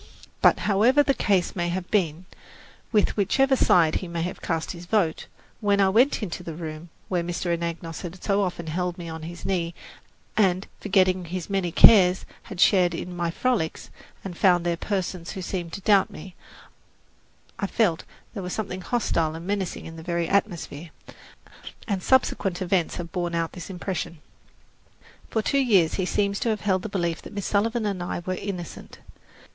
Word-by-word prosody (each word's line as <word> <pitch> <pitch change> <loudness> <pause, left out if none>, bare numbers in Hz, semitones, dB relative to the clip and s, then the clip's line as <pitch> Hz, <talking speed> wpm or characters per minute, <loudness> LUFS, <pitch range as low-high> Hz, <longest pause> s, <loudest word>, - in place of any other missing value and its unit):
But, - - +5
however 230 +8 +4
the 275 - +2
case 195 -8 +1
may 175 -1 -1
have 180 +1 -4
been, 175 -4 0 0.7
with 210 -3 +2
whichever 265 +7 +3
side 165 -10 +4
he 185 - -6
may 170 -1 -3
have 180 - -5
cast 165 -2 -2
his 175 0 -9
vote, 180 -6 +1 0.3
when 205 -1 +2
I 195 -1 +5
went 240 +4 +3
into 180 -2 -4
the 165 -3 -7
room 160 0 -7 0.2
where 180 -2 0
Mr. 175 0 -1
Anagnos 170 -1 -5
had 180 +1 -8
so 200 -1 +2
often 180 -3 -2
held 175 +3 -2
me 170 -2 -7
on 160 0 -6
his 170 +2 -8
knee 170 -3 -1 0.6
and, 190 -2 +2
forgetting 185 -2 +2
his 180 +2 -5
many 190 -3 0
cares, 185 -1 +7 0.2
had 190 - -7
shared 180 -3 +4
in 180 +2 -6
my 175 -1 -1
frolics, 195 -3 -1 0.3
and 185 -3 -5
found 175 -1 +3
there 170 -1 +1
persons 185 -2 -3
who 190 - -5
seemed 175 -2 -4
to 200 - -5
doubt 200 -1 +4
me, 180 +4 -10 1.3
I 200 - -1
felt 195 -6 +2
that - - -13 0.3
there 205 - -5
was 180 -1 -4
something 190 -4 -4
hostile 170 -8 0
and 165 +1 -8
menacing 200 -1 -2
in 165 0 -9
the - - -8
very 170 0 -1
atmosphere, 175 -5 -1 1.0
and 200 -4 -1
subsequent 195 -6 +2
events 180 -2 0
have 170 -1 -6
borne 175 -2 -2
out 165 -1 -1
this 180 - -9
impression. 180 -2 -4 1.1
For 220 - 0
two 275 +5 +2
years 195 -11 +4
he 185 -2 -1
seems 200 0 0
to 235 - 0
have 215 -2 -1
held 190 -3 +1
the 220 - -5
belief 170 -4 -1
that - - -11
Miss 200 -2 -4
Sullivan 225 +2 +1
and 200 -3 -2
I 175 0 -4
were 185 - -1
innocent. 185 -3 -6
180 Hz, 185 wpm, -25 LUFS, 170-200 Hz, 1.3 s, cares